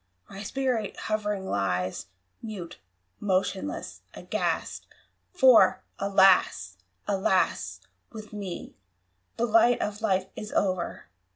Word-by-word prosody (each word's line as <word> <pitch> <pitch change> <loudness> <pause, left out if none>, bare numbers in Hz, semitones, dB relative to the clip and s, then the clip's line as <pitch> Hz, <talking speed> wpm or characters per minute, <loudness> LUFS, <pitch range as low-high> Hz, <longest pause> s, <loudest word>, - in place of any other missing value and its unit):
my 195 - -9
spirit 240 -3 -2
hovering 210 -2 -2
lies 95 - -1 0.3
Mute, 205 -7 -7 0.4
motionless, 195 +6 -2
aghast! - - -3 0.4
For, 260 - +5 0.2
alas! 190 - +3 0.3
alas! 190 -2 0 0.3
with 215 -1 -10
me 195 -4 -6 0.6
The 235 - +1
light 235 +1 +4
of 210 +1 -3
Life 190 -4 +1
is 210 - -7
o'er! 185 -3 -1
200 Hz, 95 wpm, -27 LUFS, 185-220 Hz, 0.6 s, For